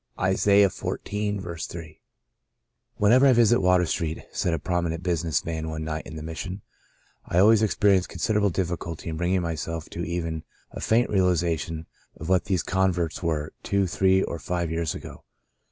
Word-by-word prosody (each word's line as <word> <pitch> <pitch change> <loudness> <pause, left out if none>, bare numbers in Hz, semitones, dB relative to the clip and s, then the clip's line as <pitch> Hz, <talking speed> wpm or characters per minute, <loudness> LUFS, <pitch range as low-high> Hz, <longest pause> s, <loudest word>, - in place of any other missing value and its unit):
— - - -20
Isa. 95 +2 +1
xiv. 100 -1 +3
j. 105 0 -2
''W 85 -4 -5 1.3
THENEVER 125 +7 +6
I 130 - +6
visit 120 -2 +4
Water 90 -1 +4
Street," 80 -1 -2
^y^ - - -12
said 90 - 0
a 85 - +1
prominent 85 +1 -2
business 85 -3 0
man 80 -1 -3
one 80 0 -4
night 80 0 -4
in 80 - -9
the 80 - -6
Mission, 90 +5 -6 0.6
I 85 - -3
al 100 +4 +7
ways 110 -1 +5
experience 100 -3 +3
considerable 105 +3 +1
difficulty 85 -2 -3
in 80 - -4
bringing 90 +2 +1
myself 80 0 -4
to 85 - -4
even 85 -2 -3 0.3
a - - -7
faint 115 +2 +2
realization 85 -4 0 0.3
of 80 - -6
what 95 -1 +3
these 95 -4 0
converts 90 -3 0
were 80 -3 -2
two, 100 -1 +1
three 95 0 +3
or 85 - -4
five 85 0 -2
years 80 -3 -1
ago. - - -10
90 Hz, 175 wpm, -25 LUFS, 80-95 Hz, 1.3 s, al